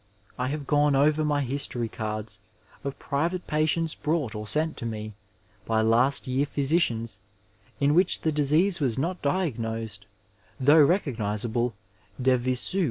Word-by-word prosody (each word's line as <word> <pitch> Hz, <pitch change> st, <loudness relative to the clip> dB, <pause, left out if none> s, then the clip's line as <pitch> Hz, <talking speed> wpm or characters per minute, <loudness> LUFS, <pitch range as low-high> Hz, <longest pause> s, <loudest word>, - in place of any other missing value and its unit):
I 125 Hz, -, -2 dB
have 145 Hz, +1 st, -4 dB
gone 145 Hz, 0 st, +2 dB
over 150 Hz, +3 st, +3 dB
my 145 Hz, -1 st, +1 dB
history 125 Hz, -3 st, 0 dB
cards 110 Hz, 0 st, -5 dB, 0.4 s
of 140 Hz, -1 st, -5 dB
private 170 Hz, +6 st, -2 dB
patients 155 Hz, +1 st, 0 dB
brought 150 Hz, -7 st, -2 dB
or 105 Hz, -1 st, -6 dB
sent 155 Hz, +6 st, +2 dB
to -, -, -6 dB
me 110 Hz, -1 st, -6 dB, 0.5 s
by 110 Hz, -1 st, +2 dB
last 120 Hz, +5 st, +2 dB
year 130 Hz, +3 st, 0 dB
physicians, 135 Hz, -6 st, 0 dB, 0.6 s
in 145 Hz, +1 st, +3 dB
which 180 Hz, +3 st, +3 dB
the 160 Hz, -, +1 dB
disease 155 Hz, +6 st, +2 dB
was 130 Hz, -6 st, 0 dB
not 175 Hz, +7 st, -2 dB
diagnosed 115 Hz, -, -2 dB, 0.5 s
though 145 Hz, +4 st, +6 dB
recognizable 120 Hz, -, 0 dB, 0.4 s
de 130 Hz, 0 st, +3 dB
msu. 130 Hz, +9 st, 0 dB
140 Hz, 140 wpm, -26 LUFS, 115-155 Hz, 0.6 s, though